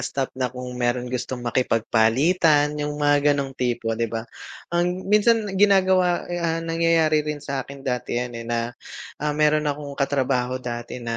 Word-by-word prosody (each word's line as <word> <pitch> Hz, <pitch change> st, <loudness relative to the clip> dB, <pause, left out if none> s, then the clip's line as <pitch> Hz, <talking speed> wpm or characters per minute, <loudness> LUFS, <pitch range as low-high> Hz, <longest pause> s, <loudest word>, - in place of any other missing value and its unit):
staff 135 Hz, -1 st, -3 dB
na 130 Hz, -1 st, -2 dB
kung 125 Hz, 0 st, -7 dB
mayro'n 120 Hz, +1 st, 0 dB
gustong 125 Hz, 0 st, -4 dB
makipagpalitan 130 Hz, +7 st, +2 dB
yung 145 Hz, 0 st, -3 dB
mga 145 Hz, 0 st, +3 dB
ganong 135 Hz, -1 st, -3 dB
tipo 120 Hz, -3 st, -1 dB
di 115 Hz, 0 st, -1 dB
ba, 115 Hz, 0 st, -4 dB, 0.5 s
ang 180 Hz, +2 st, 0 dB
minsan 220 Hz, +1 st, +4 dB, 0.2 s
ginagawa, 185 Hz, -3 st, +4 dB
eh, 175 Hz, -, -2 dB
ah, 165 Hz, 0 st, -1 dB
nangyayari 165 Hz, -2 st, +2 dB
rin 150 Hz, 0 st, -3 dB
sa'kin 140 Hz, -1 st, -6 dB
dati 125 Hz, -2 st, -2 dB
yan, 125 Hz, 0 st, -2 dB
eh, 115 Hz, -1 st, -7 dB
na, 115 Hz, 0 st, -1 dB, 0.5 s
ah, 150 Hz, 0 st, 0 dB
mayro'n 150 Hz, 0 st, +3 dB
akong 145 Hz, 0 st, -4 dB
katrabaho 130 Hz, -3 st, 0 dB
dati 120 Hz, -2 st, -6 dB
na 115 Hz, 0 st, -2 dB
140 Hz, 160 wpm, -23 LUFS, 125-160 Hz, 0.5 s, minsan